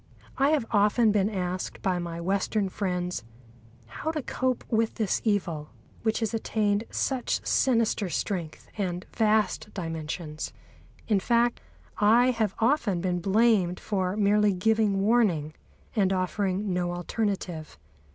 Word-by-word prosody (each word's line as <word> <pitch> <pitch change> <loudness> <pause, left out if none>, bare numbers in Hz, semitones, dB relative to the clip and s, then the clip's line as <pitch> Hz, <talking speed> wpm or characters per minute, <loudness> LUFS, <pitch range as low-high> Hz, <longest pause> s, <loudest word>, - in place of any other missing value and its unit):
I 275 +1 +4
have 300 -6 +2
often 210 +2 +4
been 205 -1 +2
asked 185 -3 -4
by 185 -2 +1
my 170 -1 -5
Western 195 +3 0
friends 180 - -2 0.6
how 135 - -5
to 310 -3 -2
cope 255 -1 -1
with 225 0 +1
this 215 -4 0
evil, 175 -8 -1 0.3
which 225 +1 0
has 225 0 -1
attained 215 -1 0
such 260 -3 -1
sinister 230 -6 +2
strength 170 -3 -3
and 180 -2 -2
vast 215 -2 +1
dimensions. 160 -2 -5 0.5
In 210 -3 +3
fact, 235 +3 +2 0.4
I 235 +5 +5
have 220 -5 -1
often 225 - +2
been 180 0 -1
blamed 195 -1 +3
for 190 -2 -1
merely 210 0 +3
giving 205 +1 +2
warning, 195 -9 +2 0.4
and 195 -4 +3
offering 190 +1 -1
no 175 -1 -1
alternative. 175 - -3
200 Hz, 130 wpm, -27 LUFS, 180-220 Hz, 0.6 s, I